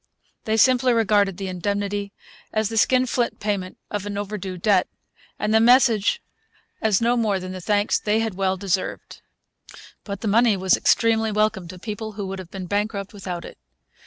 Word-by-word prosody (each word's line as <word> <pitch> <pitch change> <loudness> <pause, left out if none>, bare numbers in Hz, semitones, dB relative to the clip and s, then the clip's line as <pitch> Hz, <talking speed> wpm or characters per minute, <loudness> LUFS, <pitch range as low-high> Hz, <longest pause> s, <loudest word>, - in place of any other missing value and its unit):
They 220 0 +1
simply 255 +1 +4
regarded 205 -4 +2
the 195 - -4
indemnity 200 +2 -2 0.4
as 215 -1 0
the 225 - -5
skinflint 250 0 +2
payment 200 -3 -3
of 205 -1 -3
an 205 -1 -4
overdue 200 -2 -5
debt, 190 0 +2 0.5
and 210 +1 -1
the 220 - +6
message 235 - +4 0.6
as 215 -3 +2
no 235 +1 +2
more 215 -5 +1
than 185 0 -7
the 185 0 -7
thanks 205 +2 +1
they 210 +1 +1
had 225 -2 -1
well 190 0 0
deserved. 190 -1 -3 0.8
But 200 -2 -6
the 225 - -3
money 220 0 +4
was 190 0 +3
extremely 225 -1 +2
welcome 215 -3 0
to 185 +2 -10
people 215 +2 -6
who 200 -1 -5
would 190 0 -5
have 185 -2 -9
been 190 -1 -7
bankrupt 205 +1 -2
without 180 -4 -6
it. - - -12
205 Hz, 175 wpm, -23 LUFS, 190-220 Hz, 0.8 s, the